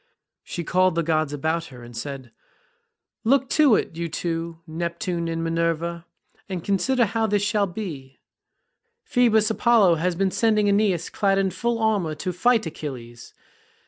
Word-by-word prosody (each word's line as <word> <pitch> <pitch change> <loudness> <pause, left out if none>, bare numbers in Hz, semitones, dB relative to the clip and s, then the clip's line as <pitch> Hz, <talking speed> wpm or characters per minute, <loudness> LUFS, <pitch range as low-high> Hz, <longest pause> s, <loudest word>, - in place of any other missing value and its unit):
She 175 - -5
called 185 +1 +2
the 170 - +1
gods 155 -2 0
about 160 +3 -1
her, 125 -5 -12
and 120 0 -12
said, 130 0 -6 0.9
"Look 265 +3 +2
to 295 -7 +5
it, 165 - -2
you 170 0 -3
two, 165 0 -3
Neptune 170 +2 -3
and 165 0 -2
Minerva, 165 +1 -1 0.4
and 180 -3 -4
consider 240 +5 +2
how 225 +2 0
this 205 -1 +1
shall 205 -1 +1
be; 160 -9 -7 0.9
Phoebus 235 - +3
Apollo 220 -7 +4
has 180 0 0
been 190 +1 +1
sending 215 -1 +2
Aeneas 200 -4 +1
clad 195 -1 +1
in 195 -1 +1
full 235 +3 -1
armour 205 -8 0
to 180 +3 -4
fight 225 +4 +2
Achilles. 120 -7 -8
180 Hz, 150 wpm, -24 LUFS, 165-215 Hz, 0.9 s, to